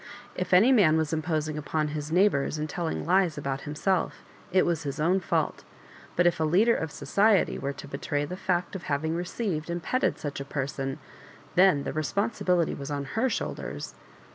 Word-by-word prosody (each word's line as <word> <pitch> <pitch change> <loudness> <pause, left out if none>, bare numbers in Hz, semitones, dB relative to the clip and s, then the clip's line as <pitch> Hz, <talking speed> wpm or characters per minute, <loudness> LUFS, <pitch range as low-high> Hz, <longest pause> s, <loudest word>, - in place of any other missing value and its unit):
If 180 - -3
any 195 +8 +6
man 180 -11 +5
was 160 0 0
imposing 155 -1 -1
upon 150 0 -1
his 150 0 -4
neijghbours 170 -5 +2
and 155 0 -2
tellmg 165 +1 -3
lies 180 -3 +2
about 135 -1 -3
himself, 175 +4 -1 0.3
it 185 0 +4
was 170 -2 0
his 145 0 -4
own 175 +5 +3
fault; 185 - -1 0.5
but 175 - +3
if 175 -2 +3
a - - +2
leader 195 +9 +4
of 160 - -2
society 205 +4 +2
.were 140 0 -3
to 145 - -10
betray 145 +1 -2
the 180 - -5
fact 185 -1 -1
of 185 - -6
having 155 +3 -1
received 175 -2 -3
and 170 -1 -3
petted 255 - +1
such 145 -2 -5
a - - -3
person, 135 -1 -3 0.6
then 180 -6 +5
the - - -4
responsibility 180 +1 0
was 140 -1 -6
on 140 -2 -3
Aer 245 +4 +2
shoulders. - - -4
160 Hz, 185 wpm, -27 LUFS, 145-185 Hz, 0.6 s, any